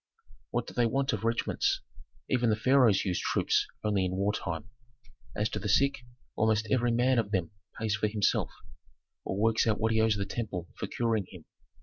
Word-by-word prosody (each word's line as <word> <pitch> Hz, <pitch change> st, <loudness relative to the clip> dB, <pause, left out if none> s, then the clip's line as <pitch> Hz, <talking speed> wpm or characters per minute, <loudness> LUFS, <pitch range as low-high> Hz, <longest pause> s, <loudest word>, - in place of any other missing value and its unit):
"What -, -, -1 dB
do -, -, -10 dB
they 120 Hz, -1 st, +2 dB
want 135 Hz, +2 st, 0 dB
of 105 Hz, 0 st, -3 dB
regiments? 115 Hz, +1 st, 0 dB, 0.5 s
Even 125 Hz, -2 st, +2 dB
the 105 Hz, -, +3 dB
pharaohs 120 Hz, -2 st, +4 dB
use 90 Hz, -2 st, 0 dB
troops -, -, +1 dB, 0.2 s
only 105 Hz, -3 st, +1 dB
in 90 Hz, 0 st, -1 dB
wartime. 100 Hz, -2 st, -2 dB, 0.7 s
As 105 Hz, -, +1 dB
to -, -, -4 dB
the 105 Hz, -, -3 dB
sick, 140 Hz, +6 st, +3 dB, 0.4 s
almost 110 Hz, 0 st, +1 dB
every 120 Hz, 0 st, +2 dB
man 125 Hz, +1 st, +3 dB
of 105 Hz, -3 st, -1 dB
them 95 Hz, -5 st, -1 dB, 0.3 s
pays 110 Hz, -2 st, 0 dB
for 105 Hz, -, +1 dB
himself, 105 Hz, -1 st, +1 dB, 0.8 s
or 95 Hz, -, -3 dB
works 115 Hz, +2 st, +2 dB
out 110 Hz, -2 st, +1 dB
what 110 Hz, +1 st, +1 dB
he 110 Hz, 0 st, +3 dB
owes 110 Hz, -1 st, +3 dB
the 100 Hz, -1 st, -2 dB
temple 95 Hz, -5 st, -4 dB
for -, -, -5 dB
curing 115 Hz, -5 st, -1 dB
him. 90 Hz, -5 st, -12 dB
110 Hz, 190 wpm, -29 LUFS, 100-115 Hz, 0.8 s, pharaohs